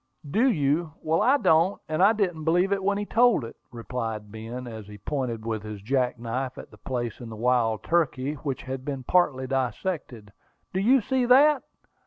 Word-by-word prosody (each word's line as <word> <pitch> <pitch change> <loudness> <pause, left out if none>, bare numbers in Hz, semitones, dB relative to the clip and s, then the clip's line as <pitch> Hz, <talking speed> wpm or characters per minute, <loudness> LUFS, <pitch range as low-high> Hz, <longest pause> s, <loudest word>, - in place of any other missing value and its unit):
"Do 225 - +3
you? 155 - 0
Well, 160 +3 +1
I 260 +6 +4
don't; 180 - +3
and 155 +2 -1
I 200 +3 +7
didn't 185 -8 -1
believe 175 +4 +2
it 195 -1 0
when 200 +1 +1
he 205 - -2
told 235 - +3
it," 115 - -10 0.2
replied 115 -3 -5
Ben, 115 +3 -7
as 110 -4 -8
he 105 0 -10
pointed 115 -1 -3
with 110 -2 -2
his 105 -1 -7
jack 125 +4 0
knife 125 +3 -4
at - - -11
a - - -14
place 120 -4 -4
in 120 - -8
the 110 - -7
wild 115 -1 +1
turkey 150 -5 0
which 140 -2 -5
he 130 - -7
had 135 0 -5
partly 145 -7 +2
dissected. 130 - -3 0.4
"Do 185 - 0
you 250 +6 +4
see 260 +3 0
that?" 280 +3 +6
135 Hz, 195 wpm, -26 LUFS, 120-185 Hz, 0.4 s, I